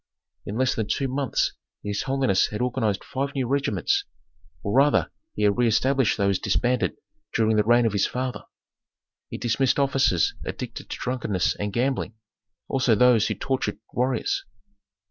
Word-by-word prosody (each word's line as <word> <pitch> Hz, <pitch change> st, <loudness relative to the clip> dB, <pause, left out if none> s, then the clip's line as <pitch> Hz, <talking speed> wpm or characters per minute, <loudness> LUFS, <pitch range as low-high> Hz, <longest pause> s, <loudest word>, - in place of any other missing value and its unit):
In 105 Hz, -, -4 dB
less 130 Hz, 0 st, +2 dB
than 110 Hz, -2 st, -2 dB
two 135 Hz, -, 0 dB
months 135 Hz, +1 st, 0 dB, 0.3 s
his 105 Hz, 0 st, -2 dB
holiness 135 Hz, -7 st, +2 dB
had 105 Hz, -, -5 dB
organized 115 Hz, -5 st, 0 dB
five 140 Hz, +2 st, -3 dB
new 130 Hz, -3 st, -1 dB
regiments, 135 Hz, -8 st, 0 dB, 0.6 s
or 100 Hz, -, -2 dB
rather 140 Hz, +2 st, +3 dB, 0.2 s
he 105 Hz, -, -1 dB
had 105 Hz, -1 st, +4 dB
reëstablished 125 Hz, +2 st, +2 dB
those 100 Hz, -2 st, +1 dB
disbanded 125 Hz, +1 st, 0 dB, 0.4 s
during 110 Hz, -1 st, +3 dB
the 105 Hz, -, +3 dB
reign 120 Hz, +2 st, +4 dB
of 110 Hz, -, +1 dB
his 100 Hz, -, +2 dB
father. 125 Hz, 0 st, -4 dB, 0.8 s
He -, -, -5 dB
dismissed 120 Hz, +2 st, +1 dB
officers 135 Hz, -, +2 dB
addicted -, -, -6 dB
to -, -, -5 dB
drunkenness 115 Hz, -7 st, -1 dB
and 105 Hz, 0 st, -3 dB
gambling, 120 Hz, 0 st, -1 dB, 0.5 s
also 130 Hz, -4 st, +2 dB
those 120 Hz, -1 st, +4 dB
who -, -, -2 dB
tortured 130 Hz, -7 st, -2 dB, 0.2 s
warriors. 125 Hz, -1 st, 0 dB
120 Hz, 150 wpm, -25 LUFS, 105-130 Hz, 0.8 s, had